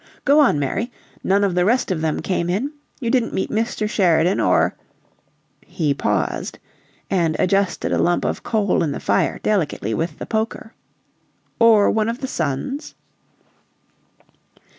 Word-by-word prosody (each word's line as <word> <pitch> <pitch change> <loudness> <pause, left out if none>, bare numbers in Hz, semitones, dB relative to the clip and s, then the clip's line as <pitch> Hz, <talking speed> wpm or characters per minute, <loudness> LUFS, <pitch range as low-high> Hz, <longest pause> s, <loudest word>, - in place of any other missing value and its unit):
"Go 290 +2 +5
on, 275 - +4
Mary. 190 - -2 0.3
None 200 +1 +2
of 195 -3 +1
the 180 0 +2
rest 230 +2 +1
of 165 -4 -1
them 160 -1 -1
came 175 -2 -1
in? 240 +12 -1 0.3
You 235 -4 -1
didn't 250 -3 +1
meet 190 - -2
Mr. 220 -1 -1
Sheridan 180 -4 +2
or - - +3 0.5
" - - -43 0.2
He 150 -4 +2
paused - - -2 0.5
and 170 -5 +1
adjusted 195 0 +1
a - - +1
lump 175 - +1
of - - -2
coal 210 -5 +1
in 155 -4 0
the - - -5
fire - - 0
delicately 155 - 0
with 165 +8 -2
the - - -6
poker. 220 0 -3 0.9
"Or 225 -3 +5
one 220 0 +1
of 235 +2 -4
the 265 - -4
sons?" 165 - -3
195 Hz, 155 wpm, -21 LUFS, 170-230 Hz, 0.9 s, Go